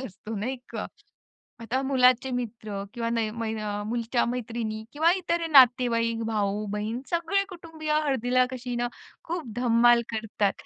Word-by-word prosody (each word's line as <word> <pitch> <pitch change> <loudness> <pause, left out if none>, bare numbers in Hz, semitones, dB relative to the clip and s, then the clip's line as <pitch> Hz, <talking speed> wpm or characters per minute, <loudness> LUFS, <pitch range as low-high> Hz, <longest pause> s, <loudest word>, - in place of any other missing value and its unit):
असतो, 210 +4 -8
नाही 250 +6 -2 0.2
का? - - -3 0.7
आता 240 +3 -1
मुलाचे 255 -1 +3
मित्र 220 -4 -4
किंवा 230 -1 -2
नय 230 -2 0
मय 225 0 -3
अ, 205 0 -3
मुलीच्या 235 +1 0
मैत्रिणी 230 -2 -3
किंवा 320 +3 +3
इतर 340 -2 -1
नातेवाईक, 240 -4 +5
भाऊ-बहीण, 210 +1 -2
सगळे 345 +4 +1
कुटुंबीय 325 -4 -5
हळदीला 255 -2 +2
कशी 250 -1 -5
ना, 240 0 0 0.4
खूप 340 0 -3
धम्माल 240 0 +5
करतात. 215 -3 0
240 Hz, 135 wpm, -27 LUFS, 220-265 Hz, 0.7 s, नातेवाईक